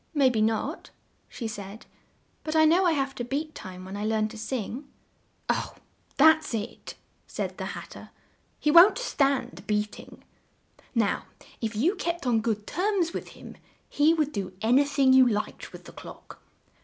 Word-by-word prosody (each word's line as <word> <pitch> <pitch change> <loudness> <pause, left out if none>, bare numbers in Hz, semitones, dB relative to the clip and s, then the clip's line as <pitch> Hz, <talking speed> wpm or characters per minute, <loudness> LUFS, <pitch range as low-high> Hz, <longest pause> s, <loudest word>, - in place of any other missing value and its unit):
"May 270 -3 +4
be 220 -3 0
not," 225 - -1 0.4
she 230 - -5
said, 205 0 -8 0.6
"but 310 0 -3
I 315 0 +6
know 350 +4 +4
I 335 - +3
have 275 -2 -1
to 245 - -5
beat 295 +5 -3
time 185 -7 -9
when 190 +1 -7
I 205 - -4
learn 215 0 0
to 225 - -11
sing." 250 +4 -4 0.6
"Oh! - - -1 0.4
that's 315 -2 +5
it," 215 -1 -6 0.3
said - - -5
the - - -3
Hat - - -10
ter. - - -11 0.5
"He 300 - +2
won't 345 +6 +8
stand 275 - -1
beat 210 0 -1
ing. - - -14 0.7
Now 220 -4 +1 0.4
if 220 -1 -3
you 300 - +2
kept 345 -5 -3
on 235 -3 +2
good 215 -2 -2
terms 365 -3 0
with - - -5
him, - - -12 0.3
he 295 +2 +3
would 305 -2 0
do 195 -5 -4
an 235 +4 +4
y 285 - +4
thing 275 -2 +3
you 260 -1 +7
liked 210 -2 -3
with - - -12
the - - -11
clock. - - -12
260 Hz, 180 wpm, -27 LUFS, 220-310 Hz, 0.7 s, won't